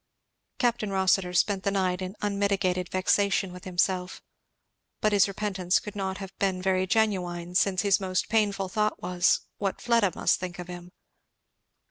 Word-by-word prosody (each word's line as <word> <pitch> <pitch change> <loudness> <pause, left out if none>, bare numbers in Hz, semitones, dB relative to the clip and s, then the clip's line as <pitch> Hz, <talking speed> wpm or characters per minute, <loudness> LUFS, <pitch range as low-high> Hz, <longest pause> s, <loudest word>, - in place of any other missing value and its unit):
Capt. 240 -2 +1
Rossitur 190 -2 +1
passed 200 -2 -3
the 200 - 0
night 190 -2 0
in 185 +2 -5
unmitigated 200 -3 0
vexation 195 0 +1
with 180 - -11
himself. 180 0 -1 0.8
But 215 - +2
his 200 -1 +5
repentance 190 -3 0
could 210 - -6
not 190 -1 -3
have 195 -1 -8
been 190 -2 0
very 185 0 +1
genuine, 180 -5 0
since 185 +1 +2
his 200 -1 +3
most 185 -2 -1
painful 205 -3 +1
thought 210 +3 -1
was, 180 0 +2 0.2
what 195 -2 -2
Fleda 230 -6 +2
must - - +2
think 180 -1 -6
of 175 -1 -7
him. 175 0 -9
190 Hz, 155 wpm, -27 LUFS, 180-200 Hz, 0.8 s, his